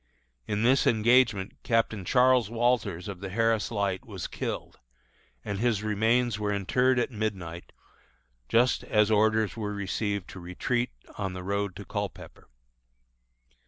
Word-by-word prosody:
In 105 +1 -1
this 130 +3 +4
engagement 115 -3 +3
Captain 115 -3 0
Charles 125 -2 +4
Walters, 115 -7 0
of 100 -3 -6
the 100 0 -6
Harris 115 +2 +1
Light, 100 -4 -1
was 95 -6 -7
killed, - - -5 0.7
and 100 -1 -3
his 110 -3 +1
remains 110 +2 +1
were 105 -1 -1
interred 125 +6 +2
at 125 +2 0
midnight 95 -6 -4 0.8
just 120 +2 +3
as 105 0 +3
orders 110 0 +2
were 105 -2 -4
received 100 -1 -2
to 95 - -9
retreat 120 +8 -2 0.3
on 95 -2 -2
the 90 0 -6
road 100 0 -2
to - - -8
Culpepper. - - -6
105 Hz, 135 wpm, -28 LUFS, 100-120 Hz, 0.8 s, this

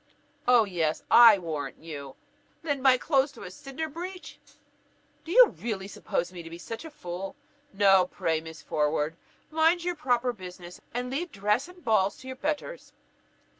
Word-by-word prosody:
"Oh! 245 -2 +6
yes, 165 -5 -1
I 230 -3 +9
warrant 160 -5 -5
you; 145 -4 -8 0.5
lend 285 -4 -1
my 260 -1 +6
clothes 275 0 +2
to 240 - -11
a 180 - -8
Cinderbreech! 320 - -7 0.8
Do 330 - -7
you - - +8
really 205 -5 -5
suppose 180 -2 -3
me 170 -1 -8
such 225 - -7
a 320 - -8
fool? 185 - -7 0.4
No, 195 -1 +5
no; 180 -1 +2
pray, 160 -3 -1
Miss 160 0 -10
Forward, 150 +1 0 0.4
mind 325 +2 +3
your 355 0 0
proper 250 -6 0
business, 180 -3 -10
and 250 +1 -3
leave 325 +5 -3
dress 210 +7 0
and 360 -1 -16
balls 200 -3 +2
to 260 - -12
your 260 - -5
betters." 305 - -4
230 Hz, 160 wpm, -28 LUFS, 180-295 Hz, 0.8 s, I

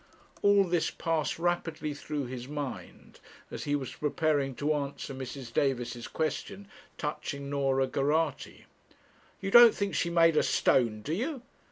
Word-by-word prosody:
All 200 -1 +5
this 175 -3 0
passed 165 -2 -1
rapidly 165 -3 -1
through 145 0 -4
his 125 0 -7
mind, 145 -2 -7 0.3
as - - -6
he 145 - +1
was 135 -3 -4
preparing 150 -3 0
to 150 +4 0
answer 140 -1 -4
Mrs. 130 -2 -7
Davis's 120 -3 -1
question 195 +5 -3 0.3
touching 140 -1 -4
Norah 135 -1 +1
Geraghty. 145 +3 -1 0.8
'You 195 0 -3
don't 240 0 +9
think 200 -1 -2
she's 170 - 0
made 165 -1 +4
of - - +4
stone, 110 -5 +2
do 155 - -3
you?' 255 - -3
150 Hz, 145 wpm, -29 LUFS, 135-165 Hz, 0.8 s, don't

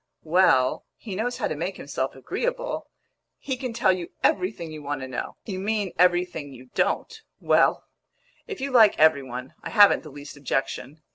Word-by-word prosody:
"Well, 155 -6 +3
he 205 -5 -7
knows 240 +5 -2
how - - -1
to 155 - -3
make 175 +5 -4
himself 135 -1 -3
agreeable. - - -3 0.5
He 265 - -3
can 255 -1 -4
tell 210 -4 +3
you 180 -2 -3
everything 180 -3 0
you 155 -1 -8
want 145 -1 -4
to 130 - -5
know." 130 - -5
"You 190 -4 -4
mean 205 -1 -1
everything 175 -4 +2
you 130 -1 -14
don't! 450 -1 -1 0.2
Well, - - +3 0.6
if 420 -3 -6
you 275 +1 -2
like 225 -5 +6
every 155 -2 +5
one, 125 0 -7
I - - -6
haven't 205 -3 +6
the 155 - -11
least 145 +1 -10
objection. 140 +1 -3
175 Hz, 180 wpm, -25 LUFS, 140-215 Hz, 0.6 s, like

